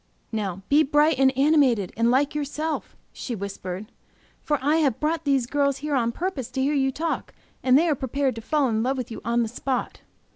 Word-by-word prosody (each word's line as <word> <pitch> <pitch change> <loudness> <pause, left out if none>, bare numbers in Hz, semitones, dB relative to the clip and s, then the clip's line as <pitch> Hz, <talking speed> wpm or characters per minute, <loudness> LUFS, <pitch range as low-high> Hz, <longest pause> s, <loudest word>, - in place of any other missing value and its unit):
"Now 195 -4 -3
be 290 +2 +5
bright 295 -1 +3
and 265 0 +5
animated, 270 - +3
and 230 +1 +2
like 275 +4 +2
yourself," 300 +2 -3 0.2
she 245 - -5
whispered, 200 0 -6 0.5
"for 295 - 0
I 295 +4 +2
have 280 -8 +1
brought 320 +1 -1
these 275 -3 +2
girls 280 +1 +1
here 295 +1 -4
on 235 -4 +1
purpose 315 -4 -4
to 265 - -1
hear 285 +2 +1
you 270 -2 +2
talk, 320 +5 -3 0.3
and 255 0 +5
they 335 +4 +3
are 315 - +3
prepared 270 0 -1
to 225 - -7
fall 290 +4 +1
in 220 -2 0
love 265 +3 0
with 245 -2 -5
you 225 - -7
on 235 0 +1
the - - -2
spot." 250 +2 -3
270 Hz, 210 wpm, -24 LUFS, 235-295 Hz, 0.5 s, be